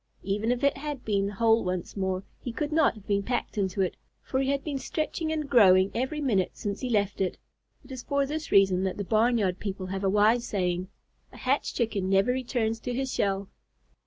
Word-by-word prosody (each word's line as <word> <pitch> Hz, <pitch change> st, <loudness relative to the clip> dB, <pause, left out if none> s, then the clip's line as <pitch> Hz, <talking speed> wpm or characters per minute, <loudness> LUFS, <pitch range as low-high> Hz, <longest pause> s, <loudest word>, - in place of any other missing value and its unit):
Even 205 Hz, +4 st, 0 dB
if 245 Hz, +1 st, -1 dB
it 280 Hz, -, +3 dB
had 290 Hz, -2 st, -5 dB
been 200 Hz, -2 st, +1 dB
whole 225 Hz, +2 st, +3 dB
once 180 Hz, -1 st, -3 dB
more, 190 Hz, -1 st, -1 dB, 0.2 s
he 245 Hz, -, -5 dB
could 290 Hz, +6 st, -3 dB
not 310 Hz, -4 st, +3 dB
have 210 Hz, -2 st, -14 dB
been 200 Hz, -1 st, +1 dB
packed 240 Hz, +4 st, -2 dB
into 195 Hz, -2 st, -1 dB
it, 185 Hz, -, 0 dB, 0.3 s
for 260 Hz, -, -1 dB
he 270 Hz, 0 st, 0 dB
had 280 Hz, 0 st, 0 dB
been 285 Hz, -3 st, -3 dB
stretching 315 Hz, +3 st, -2 dB
and 305 Hz, -2 st, -2 dB
growing 190 Hz, -7 st, +6 dB
every 265 Hz, +5 st, -2 dB
minute 215 Hz, -11 st, 0 dB
since 200 Hz, -1 st, -3 dB
he 255 Hz, -, -3 dB
left 205 Hz, -3 st, 0 dB
it. 185 Hz, -, -1 dB, 0.5 s
It -, -, -13 dB
is 260 Hz, -2 st, -6 dB
for 280 Hz, +2 st, 0 dB
this 310 Hz, +3 st, -5 dB
reason 190 Hz, -2 st, +4 dB
that 190 Hz, -, -2 dB
the 205 Hz, -, -2 dB
barn 225 Hz, +4 st, +3 dB
yard 190 Hz, -4 st, 0 dB
people 195 Hz, -2 st, -4 dB
have 190 Hz, +1 st, -4 dB
a 195 Hz, -, +3 dB
wise 215 Hz, +4 st, +4 dB
saying: 180 Hz, -2 st, -1 dB, 0.4 s
"A -, -, -13 dB
hatched 270 Hz, +3 st, 0 dB
chicken 210 Hz, -6 st, -1 dB
never 195 Hz, +5 st, +3 dB
returns 235 Hz, -3 st, -1 dB
to 245 Hz, +1 st, -4 dB
his 265 Hz, 0 st, -2 dB
shell." 195 Hz, -1 st, 0 dB
220 Hz, 220 wpm, -27 LUFS, 195-260 Hz, 0.5 s, growing